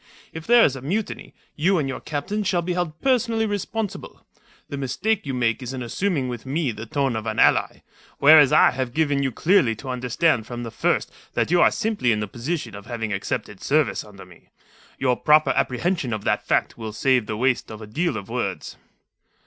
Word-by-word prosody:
If 160 0 -8
there 240 0 +7
is 135 - +1
a 130 - -8
mutiny, 195 - -4 0.2
you 180 +5 +2
and 145 -4 0
your 135 - -4
captains 195 +8 -3
shall 175 -2 +1
be 180 +1 -2
held 175 -3 -3
personally 235 -4 +1
responsible. 210 0 -4 0.4
The - - -6
mistake 145 - -1
you 135 - -2
make 120 0 0
is 125 +1 -5
in 130 -1 -4
assuming 145 +2 -1
with 120 -3 -6
me 140 0 -1
the 110 +1 -8
tone 135 -2 0
of 110 - -4
an - - -3
ally, - - +2 0.3
whereas 145 -1 +7
I - - +6
have 130 -2 -4
given 145 -3 +1
you 135 -1 0
clearly 155 - +2
to 130 +5 -9
understand 125 0 0
from 120 -1 -6
the 115 - -6
first - - 0 0.2
that - - 0
you 175 0 +4
are - - +6
simply 215 - 0
in 105 - +1
the 105 - -3
position 120 - -4
of 100 +1 -10
having 110 -3 -3
accepted 100 0 -4
service 150 0 +1
under 100 -3 -13
me. 90 -2 -19 0.5
Your 130 -2 +1
proper 155 +4 +4
apprehension 140 -1 -1
of 105 -1 -4
that - - -1
fact - - 0
will 110 -1 -6
save 125 -1 +2
the 110 - -3
waste 125 +1 0
of 110 - -8
a 110 - -8
deal 145 +5 -1
of 100 -2 -7
words." 115 -5 -4
135 Hz, 205 wpm, -23 LUFS, 115-170 Hz, 0.5 s, there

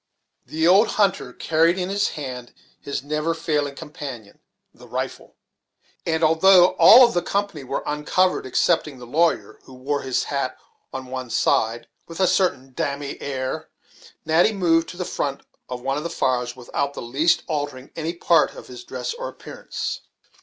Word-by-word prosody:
The 160 +1 0
old 195 +5 +6
hunter 195 -11 +1
carried 165 +6 +2
in 180 0 -2
his 200 +1 +1
hand 125 -4 -7 0.3
his 140 - -4
never 150 +3 -1
failing 150 -4 -1
companion, 135 -9 -9 0.3
the - - -16
rifle; - - -5 0.7
and 160 0 0
although 180 +3 +6
all 250 +2 +10
of 235 - -1
the 175 - +1
company 200 -8 -2
were 130 +1 -3
uncovered 150 +3 0
excepting 150 +1 +1
the 125 - -10
lawyer, 160 +7 0
who 130 - -13
wore 140 +3 -2
his 130 -1 -1
hat - - -3 0.3
on 130 0 -6
one 130 -1 -6
side, 115 +1 +1 0.2
with 165 +1 -9
a 190 - +4
certain 135 -9 +1
dam'me 140 +2 -3
air, 135 +3 -4 0.6
Natty 165 +7 +3
moved 165 -4 +2
to 175 - -9
the 180 - -3
front 140 -5 -3 0.3
of 125 -1 -5
one 135 +1 -1
of 150 - -3
the 170 - -3
fires 125 -4 -1
without 140 +3 -3
in - - -5
the - - -8
least 145 +8 +2
altering 145 -4 -4
any 165 +1 -3
part 170 -2 +3
of - - -10
his 125 -1 -10
dress 125 -1 -5
or - - -5
appearance. - - -6
150 Hz, 170 wpm, -23 LUFS, 130-170 Hz, 0.7 s, all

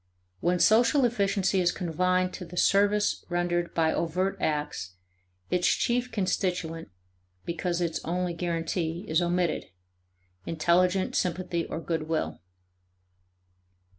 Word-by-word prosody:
When 180 - +1
social 240 - +4
efficiency 200 -4 +1
is 175 -1 +3
confined 185 +1 0
to - - -6
the 180 +1 -10
service 205 +3 +3
rendered 175 0 0
by 160 -1 +2
overt 180 +4 0
acts, 145 - -2 0.6
its 180 -1 +2
chief 245 +1 0
constituent 180 -4 -2 0.6
(because 170 +1 -2
its 170 -2 -2
only 180 +1 -1
guarantee) 170 +1 -2
is 160 +2 +2
omitted, 175 -1 0 0.8
intelligent 180 - +1
sympathy 175 -1 -1
or - - -4
good 160 -1 -3
will. 160 -1 -2
175 Hz, 110 wpm, -28 LUFS, 165-185 Hz, 0.8 s, social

